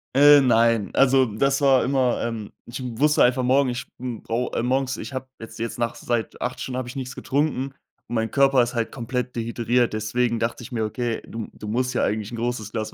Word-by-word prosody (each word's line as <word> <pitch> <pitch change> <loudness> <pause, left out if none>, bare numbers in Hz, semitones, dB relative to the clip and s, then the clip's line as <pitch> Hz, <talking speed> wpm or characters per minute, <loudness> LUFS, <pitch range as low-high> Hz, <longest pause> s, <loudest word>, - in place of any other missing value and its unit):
Äh, 145 +1 +8
nein, 115 -4 +3
also, 135 -1 +5
das 135 +5 +1
war 135 -2 +5
immer, 130 -1 +1
ähm 115 -3 -4 0.2
ich 120 +3 -6 0.2
wusste 150 +1 +4
einfach 125 +1 +3
morgen, 130 +2 +3
ich 120 +1 -4
brau 120 -1 -3
äh, - - 0
morgens, 130 +2 0
ich - - -7
habe 130 -1 -5
jetzt 115 - -9
jetzt 115 +1 -4
nach 120 0 -1
seit 120 -3 -3
8 - - -3
Stunden 130 -1 -4
habe 130 -1 -3
ich 125 - -8
nix 130 -2 -5
getrunken 140 -1 -1 0.3
und 120 - -7
mein 115 0 0
Körper 135 +1 +4
ist 120 +1 -1
halt 115 -1 -1
komplett 125 0 -4
dehydriert. 120 +1 0
Deswegen 115 +2 0
dachte 115 +1 -2
ich - - -10
mir: 115 -3 -1
„Okay, 120 +1 -2
du 115 - -7
m - - -14
du 105 - -9
musst 125 +4 -1
ja - - +2
eigentlich 110 +1 -1
'n - - -5
großes 115 -2 -3
Glas 110 -1 -4
120 Hz, 225 wpm, -24 LUFS, 115-130 Hz, 0.3 s, Äh